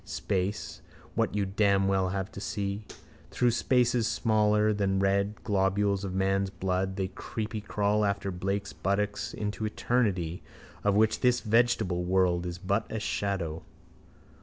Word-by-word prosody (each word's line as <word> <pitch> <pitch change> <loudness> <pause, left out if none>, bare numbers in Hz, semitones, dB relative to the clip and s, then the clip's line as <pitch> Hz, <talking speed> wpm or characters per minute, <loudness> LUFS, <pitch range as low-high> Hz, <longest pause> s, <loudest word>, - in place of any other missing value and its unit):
Space: 100 +1 -3 0.3
what - - 0
you 100 -1 +1
damn 100 0 +2
well 95 -1 +2
have 95 0 -3
to 100 - -8
see. 100 -1 -3 0.4
Through 125 -1 +2
spaces 120 -1 +2
smaller 105 -1 +2
than 100 -2 0
red 100 +2 +1
globules 100 -1 +1
of 95 -1 -4
man's 95 0 +1
blood 95 0 -1
they 95 -1 -2
creepycrawl 105 -1 -2
after 100 -1 -1
Blake's 100 +3 -3
buttocks 100 +2 -1
into 105 +1 -4
eternity 100 -6 0 0.4
of 100 -1 +3
which 110 +1 +3
this 125 -1 +3
vegetable 110 -5 +2
world 90 -1 +2
is 85 -1 -5
but 100 +4 -1
a 110 - -2
shadow. 95 -6 -2
100 Hz, 135 wpm, -29 LUFS, 95-105 Hz, 0.4 s, of